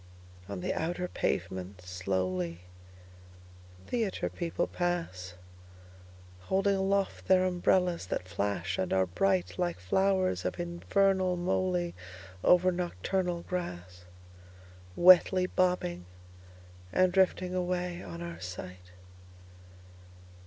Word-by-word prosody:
On 100 -2 -5
the - - -1
outer 175 +2 -2
pavement, 95 - -3
slowly, 90 -1 -2 1.2
Theatre 225 -5 -1
people 170 -2 -2
pass, 165 - -3 1.1
Holding 195 +1 +3
aloft 195 0 0
their 185 0 +5
umbrellas 180 - +1
that 90 - -3
flash 95 0 -2
and 95 - -1
are 95 0 +3
brightLike 90 -1 0
flowers 185 - +1
of - - -3
infernal 185 +2 +1
molyOver 175 - 0
nocturnal 175 - -2 1.5
grassWetly 185 +1 +7
bobbing 135 - 0 0.8
and 185 -1 +3
drifting 185 -1 +2
away 180 -1 -2
on 85 -2 -7
our 85 -1 -7
sight. 90 0 -8
170 Hz, 90 wpm, -30 LUFS, -, 1.5 s, grassWetly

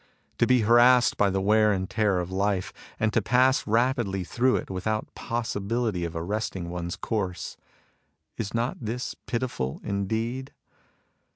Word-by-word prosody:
To - - +4
be 125 -2 +4
harassed 120 +3 +5
by 100 - +3
the 95 0 0
wear 105 +1 +4
and 95 -2 -1
tear 105 -3 +1
of 90 0 -3
life, 95 0 0 0.3
and 110 -1 +1
to 115 - +3
pass 130 +5 +3
rapidly 115 -4 +1
through 125 +8 +1
it - - -3
without 110 +4 -2
possibility 115 -4 -2
of 85 - -6
arresting 90 0 -3
one's 85 0 -4
course, 95 -6 -3 0.4
— - - -47
is 105 -3 -2
not 115 +2 -1
this 120 +3 -3
pitiful 115 - -2
indeed 115 +7 -2
110 Hz, 150 wpm, -26 LUFS, 95-120 Hz, 0.4 s, harassed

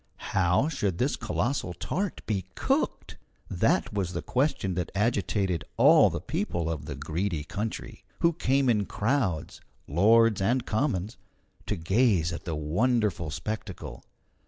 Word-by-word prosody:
How 90 - +3
should 120 - -1
this 130 +7 +1
colossal 120 -8 -2
tart 195 - -3
be 100 -4 -1
cooked? - - -1 0.3
That - - +1
was 95 -4 -2
the 85 - -3
question 130 -8 0
that 90 0 -3
agitated 100 -5 0
all - - +7
the - - -3
people 85 -1 -2
of 75 -3 -5
the 70 - -4
Greedy 80 +4 -2
country, 105 +7 -5 0.2
who 170 0 +4
came 135 -3 +1
in 105 -5 +2
crowds 105 - -1 0.3
lords 110 +6 +4
and 120 +5 +1
commons 110 -4 -1 0.5
to - - 0
gaze 90 -1 +2
at 85 - -7
the 80 - -2
wonderful 90 +3 0
spectacle. 90 +8 -6
100 Hz, 135 wpm, -27 LUFS, 85-120 Hz, 0.5 s, all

